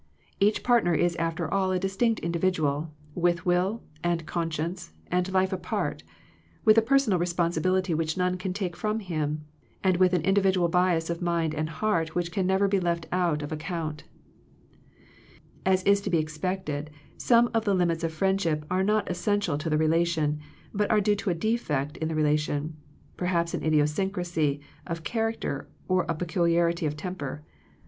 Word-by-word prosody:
Each 205 +2 +2
partner 235 -9 +3
is 175 +2 +2
after 165 -1 -1
all 190 -1 +2
a 185 - +1
dis 195 +1 -3
tinct 230 +1 +1
individual, 165 -3 0 0.2
with 175 +1 +1
will, 185 +5 +1 0.2
and 170 -2 0
conscience, 165 +1 -3 0.2
and 180 +1 +1
life 190 0 +2
apart, 180 -3 -2 0.6
with 215 - +7
a 225 - +6
personal 235 -5 +3
responsi 170 -1 0
bility 185 0 +1
which 160 +1 -1
none 180 0 +1
can 185 0 -3
take 180 -2 -3
from 215 +2 -1
him, 155 -6 -3 0.4
and 185 -2 +3
with 185 0 +4
an 175 -3 +2
individual 190 -2 +3
bias 175 -2 +2
of 170 - -4
mind 170 -2 0
and 155 0 -2
heart 165 -2 -1
which 175 -1 -1
can 185 +1 0
never 190 +1 +3
be 195 0 +2
left 170 -2 -1
out 170 -5 +1
of 145 - -6
account 155 -1 -4 1.6
As 185 0 +3
is 200 +1 +4
to 200 - -3
be 175 - +3
expected, 155 -1 -3 0.3
some 240 0 +3
of 225 -1 +1
the 200 -2 +3
lim 175 -2 +2
its 165 0 -4
of 165 - 0
friendship 165 -3 0
are 185 +1 +2
not 210 +2 +1
essential 195 -2 0
to 160 +2 -3
the 155 - +2
relation, 160 -1 +1 0.3
but 205 0 0
are 215 - +4
due 205 0 +2
to 200 0 -2
a 175 - +1
defect 160 - -1
in 160 - -2
the 160 - -2
re 155 - +2
lation, 150 0 0 0.5
perhaps 170 -2 0
an - - -3
idiosyncrasy 155 -1 +1 0.3
of 165 -2 -4
char 225 +2 0
acter 145 -10 -5 0.2
or 185 -1 +1
a 165 - +1
peculiarity 170 0 +1
of 150 0 -4
temper. 150 -4 -5
175 Hz, 180 wpm, -27 LUFS, 160-190 Hz, 1.6 s, with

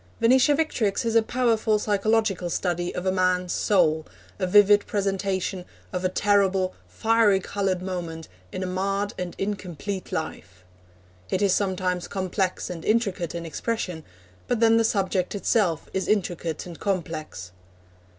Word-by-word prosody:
Venetia 255 +5 +5
Victrix 235 -10 0
is 230 - 0
a 230 - +7
powerful 225 -2 +1
psychological 210 -3 +1
study 175 0 -1
of 180 - -4
a 185 - +2
man's 185 -1 +1
soul, 160 -6 +2 0.4
a 185 - 0
vivid 205 +1 +5
presentation 195 -2 -1 0.3
of 180 0 -2
a 185 - +2
terrible, 195 -1 +2
fiery 225 -3 +3
coloured 190 -1 -2
moment 170 -4 -5 0.2
in 185 - -4
a - - -2
marred 195 +2 -1
and 180 -1 -4
incomplete 195 -1 -4
life. 160 - -5 0.7
It 190 - 0
is 195 -2 +4
sometimes 185 -3 -1
complex 190 0 -2
and 170 -2 -6
intricate 200 -7 0
in 170 0 -4
expression, 180 -1 -3 0.4
but 245 - 0
then 225 0 +5
the 230 - +4
subject 195 -3 0
itself 195 -5 +1
is 190 - -1
intricate 175 -6 -1
and 175 -2 -9
complex. 155 - -3
190 Hz, 140 wpm, -25 LUFS, 180-210 Hz, 0.7 s, a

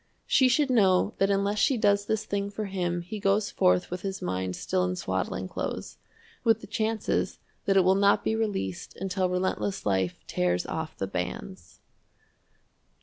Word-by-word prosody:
She 260 - +4
should 275 +1 +2
know 190 -6 +4
that 195 - +3
unless 200 +1 +1
she 270 - +3
does 200 -2 +2
this 220 -1 0
thing 200 0 -2
for 210 +1 -4
him 175 -3 -2
he 210 +5 -6
goes 200 +1 +1
forth 90 - +2
with 180 0 -4
his 195 0 -4
mind 95 0 -2
still 90 - 0
in 90 0 -1
swaddling 95 0 -2
clothes, - - -5 0.4
with 225 -1 +3
the - - -8
chances 220 +1 -1 0.3
that 195 -1 +3
it 190 - +6
will 185 +1 +5
not 200 +1 +3
be 220 - +1
released 200 - -3
until 185 0 0
relentless 185 +2 -1
life 95 -3 +1
tears 90 0 0
off 160 0 -4
the 95 - -1
bands. 90 -1 -6
195 Hz, 170 wpm, -27 LUFS, -, 0.4 s, it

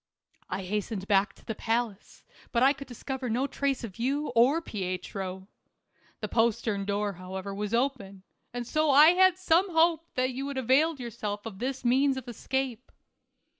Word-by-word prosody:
I 190 +1 -3
hastened 205 +1 -3
back 200 0 +2
to - - -21
the 225 - -3
palace, 225 -2 -3 0.3
but 235 +1 +2
I 275 +2 +6
could 275 0 -10
discover 260 +1 -5
no 245 +4 +1
trace 280 -2 -1
of 220 -2 -8
you 280 +5 0
or 255 +8 +4
Pietro. 190 - -5 0.7
The - - -2
postern 220 -3 +1
door, 205 0 -1
however, 190 +2 -6
was 210 +2 -2
open, 230 -7 -2 0.3
and 245 0 -4
so 310 +4 +1
I 290 +3 +8
had 370 +1 +5
some 370 +1 +2
hope 330 0 +3
that 255 0 +1
you 270 +2 -4
had 280 -1 -5
availed 275 +5 +2
yourself 210 -3 -5
of 205 -4 -7
this 260 +1 -3
means 265 +2 +3
of 260 -1 -7
escape. 255 +1 -3
240 Hz, 170 wpm, -28 LUFS, 205-275 Hz, 0.7 s, I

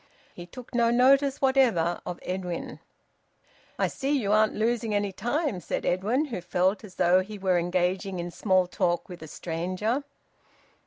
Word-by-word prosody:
He 175 0 -10
took 250 +8 -12
no 235 -1 +3
notice 270 +3 +4
whatever 240 -11 +2
of 180 - -4
Edwin. 180 -2 -4 1.0
"I - - +2
see 270 - -4
you 205 -6 -1
aren't 215 0 +3
losing 225 -1 0
any 205 -1 0
time," 240 - -1
said 170 - -4
Edwin, 215 - +1
who 230 -11 -5
felt 185 +4 0
as 195 -4 -12
though 180 +2 +4
he 205 +3 -8
were 185 -2 +1
engaging 180 +2 -1
in 175 0 -4
small 185 0 +2
talk 175 -1 -1
with 180 -3 -10
a 160 - -8
stranger. 185 - -2
195 Hz, 160 wpm, -27 LUFS, 180-235 Hz, 1.0 s, notice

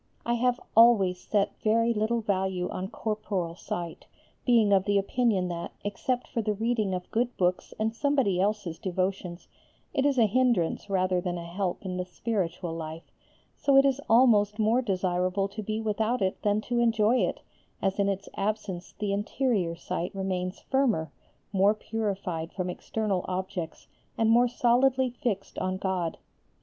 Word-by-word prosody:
I 235 - +1
have 245 +1 +1 0.2
always 205 -6 +6
set 205 -2 -1
very 230 +2 +3
little 225 +2 0
value 190 -3 -1
on 185 - -4
corporal 205 -5 -3
sight, 170 -2 -6 0.4
being 225 -4 +5
of 195 +1 +2
opinion 200 -1 +2
that, 170 -1 -5
except 245 +5 -2
for 230 - -2
the 210 -1 -1
reading 220 -3 0
of 180 0 -7
good 245 +2 0
books 180 0 0
and 220 +1 0
somebody 260 -9 +2
else's 195 -5 -1
devotions, 185 -1 -3 0.5
it 270 - +1
is 280 -2 +2
a 230 - +6
hindrance 215 -5 +1
rather 185 -2 +1
than 175 -1 -2
a 170 - -6
help 180 +3 -3
in 180 -1 -3
the 180 - -2
spiritual 180 -3 -3
life, 160 0 -7 0.4
so 275 -1 +3
it 275 - +7
is 275 0 +2
almost 215 -3 +5
more 225 +3 +3
desirable 185 -2 0
to 210 +2 -6
be 215 +1 -3
without 220 +1 0
it 185 - -1
than 205 0 +1
to 240 +2 -1
enjoy 230 0 +3
it, - - -1 0.4
as 195 0 -1
in 200 0 +3
its 195 0 -3
absence 195 -3 -3
the 205 -2 -1
interior 205 -4 0
sight 170 +2 -4
remains 185 -1 -3
firmer, 230 - +1 0.4
more 200 +2 +4
purified 195 -7 -3
from 185 -2 -3
external 200 -1 -2
objects, 180 -3 -4 0.3
and 225 0 +3
more 240 +2 +5
solidly 255 +2 +2
fixed 235 -5 -3
on 185 0 -1
God. 185 -3 -2
205 Hz, 160 wpm, -28 LUFS, 185-230 Hz, 0.5 s, it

